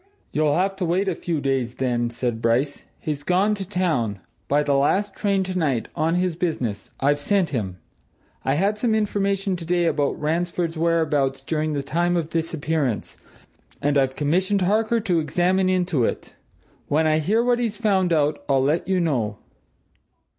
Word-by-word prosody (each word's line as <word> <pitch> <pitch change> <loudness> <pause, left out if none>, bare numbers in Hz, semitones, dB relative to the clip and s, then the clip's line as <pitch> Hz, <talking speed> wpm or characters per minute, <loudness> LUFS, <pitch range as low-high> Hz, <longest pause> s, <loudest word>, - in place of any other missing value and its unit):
"You'll 150 -1 +2
have 195 +2 +1
to 190 - -1
wait 180 +4 +1
a 190 - +1
few 165 -1 -3
days, 135 -4 -1
then," 120 -2 0
said 115 -1 -3
Bryce. 125 +5 0
"He's 150 -3 -3
gone 185 +7 +2
to 195 -3 -5
town 155 - 0 0.3
by 145 +1 +2
the 145 - +1
last 190 +9 +2
train 200 -2 +1
tonight 160 -10 -1
on 165 +3 +1
this 180 -1 0
business. 155 - -3
I've 145 +2 +2
sent 185 0 +1
him. 100 -9 -3 0.7
I 135 - +1
had 200 +6 +1
some 225 -1 +2
information 200 -2 0
today 175 0 0
about 145 -4 0
Ransford's 170 +2 -1
whereabouts 150 -5 +1
during 155 +1 -1
the 140 -1 -2
time 175 +4 0
of 165 -2 -3
disappearance, 160 -6 -1 0.6
and 145 0 +1
I've 135 -1 +2
commissioned 185 +7 +1
Harker 220 +5 +2
to 180 -6 +1
examine 180 +5 +1
into 180 -7 +1
it. - - -3 0.5
When 155 +2 +2
I 155 0 +3
hear 215 +9 +2
what 245 0 +2
he's 225 -4 -1
found 195 -6 +2
out, 150 -2 +1
I'll 135 -1 +3
let 155 +5 +1
you 190 -1 +2
know." 120 -11 0
165 Hz, 170 wpm, -23 LUFS, 140-185 Hz, 0.7 s, I